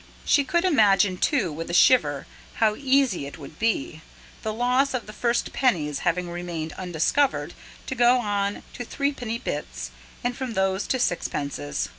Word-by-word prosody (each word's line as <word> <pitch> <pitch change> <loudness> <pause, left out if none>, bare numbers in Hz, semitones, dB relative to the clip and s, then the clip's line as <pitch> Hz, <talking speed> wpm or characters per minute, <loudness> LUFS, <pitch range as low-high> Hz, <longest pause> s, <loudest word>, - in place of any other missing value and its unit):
She 285 - +4
could 345 +6 +1
imagine, 200 - +4
too, 205 - +1
with 165 +2 -6
a 170 - -1
shiver, 145 - +4 0.3
how 215 -2 +2
easy 265 - +1
it 140 - -9
would 150 0 -12
be, 210 -8 -1 0.4
the 220 - -2
loss 250 +4 +1
of 245 - -3
the 215 - -10
first 240 +1 0
pennies 155 - +1
having 175 0 -1
remained 170 -2 -5
undiscovered, 175 - 0 0.3
to - - -3
go 245 0 +4
on 205 -3 -1
to 245 - -5
threepenny 250 -3 -2
bits, - - -5 0.3
and 245 0 -1
from 255 -3 -5
these 190 +1 0
to 260 - +1
sixpences. 140 - -2
205 Hz, 160 wpm, -25 LUFS, 170-250 Hz, 0.4 s, She